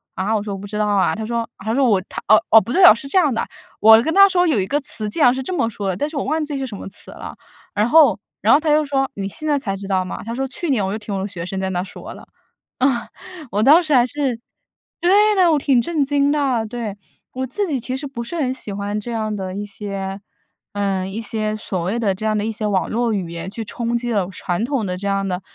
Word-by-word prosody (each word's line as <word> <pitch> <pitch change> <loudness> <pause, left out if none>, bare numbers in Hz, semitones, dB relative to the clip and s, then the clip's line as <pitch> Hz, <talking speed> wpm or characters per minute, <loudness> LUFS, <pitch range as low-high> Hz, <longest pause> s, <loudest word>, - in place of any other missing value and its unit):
“啊？” 190 +3 -2
我 210 - 0
说： 205 -2 -4
“我 195 - -8
不 205 - -8
知 210 +1 -5
道 210 0 +1
啊。” 200 -2 +2
他 220 - -4
说 235 0 -2
他 220 +1 -3
说 275 - +3
我 205 - +4 0.3
哦 215 0 +6
哦， 225 - +9
不 230 +5 -6
对 380 - +4
哦， 225 - +10
是 255 - -8
这 375 - +3
样 300 -7 +2
的， 230 - -1 0.4
我 220 +1 +8
跟 320 - -1
他 395 0 +7
说 360 -1 +2
有 275 -11 +2
一 190 - -3
个 290 - +1
词 215 -5 -4
竟 310 - -3
然 245 - +6
是 265 0 -4
这 370 - -4
么 250 -9 0
说 205 -3 -4
的， 180 - -2
但 290 +8 -1
是 310 - -10
我 - - -1
忘 310 +2 0
记 290 -2 -4
是 270 - -3
什 215 - -7
么 - - -8
词 - - -5
了。 - - -9 0.4
然 210 +3 +1
后 315 +2 +6 0.2
然 - - +5
后 295 - +6
他 310 -1 0
又 305 0 +3
说： 270 -1 0
“你 195 0 -3
现 305 - -8
在 290 -2 +2
才 195 -7 -3
知 195 - -8
道 185 -2 0
吗？” - - -6
他 230 - -4
说： 270 +1 -2
“去 330 +5 -4
年 220 -8 +1
我 190 - -2
就 - - -2
听 210 -1 -6
我 - - -2
的 200 - -2
学 175 -4 -6
生 190 +1 -4
在 190 - -2
那 180 0 -1
儿 - - -4
说 - - -10
了。” - - -13 0.5
嗯， 265 - +4 0.6
我 205 - 0
当 315 +7 +7
时 305 -3 0
还 245 - +5
是 260 -2 -2 0.6
对 415 +4 +4
的， 360 -3 +4
我 300 - +3
挺 270 -3 +3
震 315 +1 0
惊 285 +1 +2
的， 265 -6 +1
对， 220 -3 -5 0.4
我 260 +1 -3
自 405 - -1
己 280 -6 -1
其 255 +2 -4
实 285 +1 -5
不 235 -3 -6
是 345 - -6
很 260 -5 0
喜 215 -6 -7
欢 205 +1 -3
这 240 +3 -6
样 215 -2 -2
的 190 -2 -5
一 205 - -4
些 200 -2 -5 0.5
呃， 195 -2 -1
一 210 +4 -5
些 215 0 -2
所 195 -3 -4
谓 205 +7 -1
的 200 -4 0
这 215 - -6
样 215 0 +1
的 205 - -1
一 225 - -1
些 215 0 -4
网 195 -3 0
络 230 0 0
语 185 -4 -3
言 170 +1 -6
去 225 +1 -5
冲 235 +2 -3
击 240 0 -3
了 200 -5 0
传 185 +3 -2
统 270 -3 -1
的 180 -1 -3
这 200 +2 -4
样 195 0 0
的 180 0 -3
225 Hz, 310 characters per minute, -20 LUFS, 200-275 Hz, 0.6 s, 哦